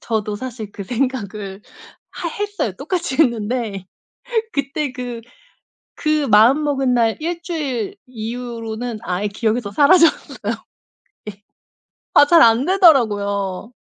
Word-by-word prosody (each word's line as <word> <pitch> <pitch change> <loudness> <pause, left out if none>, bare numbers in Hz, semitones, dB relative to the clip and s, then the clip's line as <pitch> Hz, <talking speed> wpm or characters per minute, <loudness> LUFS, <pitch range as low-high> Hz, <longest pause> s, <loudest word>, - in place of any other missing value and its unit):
저도 215 -2 -2
사실 225 -3 -7
그 200 - -7
생각을 210 -5 -3 0.5
하 340 - -5
했어요. 410 - -3
똑같이 315 -1 -3
했는데. 225 - 0 0.7
그때 280 0 -2
그 245 -2 -6 0.7
그 305 -2 0
마음먹은 265 +4 +4
날 230 -2 +2
1 340 +1 -3
주일 285 - -3
이후로는 230 -1 -5
아예 185 +3 -1
기억에서 215 +1 -1
사라졌어요. 325 - +3 0.8
예. 200 +1 -17 0.7
아 290 - +7
잘 335 +1 +6
안 230 +5 +4
되더라고요. 210 - +2
245 Hz, 230 characters per minute, -20 LUFS, 215-290 Hz, 0.8 s, 아